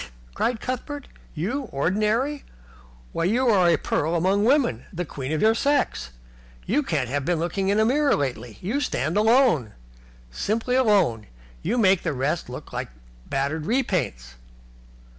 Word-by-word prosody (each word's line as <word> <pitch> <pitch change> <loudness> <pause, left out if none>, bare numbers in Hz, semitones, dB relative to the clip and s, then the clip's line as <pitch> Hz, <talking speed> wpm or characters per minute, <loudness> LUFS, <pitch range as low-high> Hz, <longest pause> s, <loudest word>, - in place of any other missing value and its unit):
cried 240 - -1
Cuthbert. 260 +4 -5 0.3
"You 240 - -2
ordinary? 215 - 0 0.7
Why, 165 - -1
you 245 +7 +2
are 185 -5 +4
a 170 - +4
pearl 160 +3 -1
among 190 +4 +2
women, 260 +1 +2
the 180 -2 -4
queen 135 -2 -6
of 155 - 0
your 220 +1 +5
sex. 275 - 0 0.6
You 260 +10 +1
can't 150 - -1
have 140 +3 -2
been 175 +4 0
looking 175 +4 -1
in 205 +2 +2
a 220 - +4
glass 285 +4 +3
lately. 120 -6 -4
You 220 +10 -1
stand 155 - -1
alone. 220 - +3 0.6
Simply 225 - -1
alone. 195 - +2 0.3
You 225 +8 -1
make 195 -5 +4
the 165 - -2
rest 135 +3 -2
look 125 - -9
like - - -4 0.4
battered 145 +4 -2
repaints." 185 - -1
190 Hz, 150 wpm, -24 LUFS, 150-245 Hz, 0.7 s, your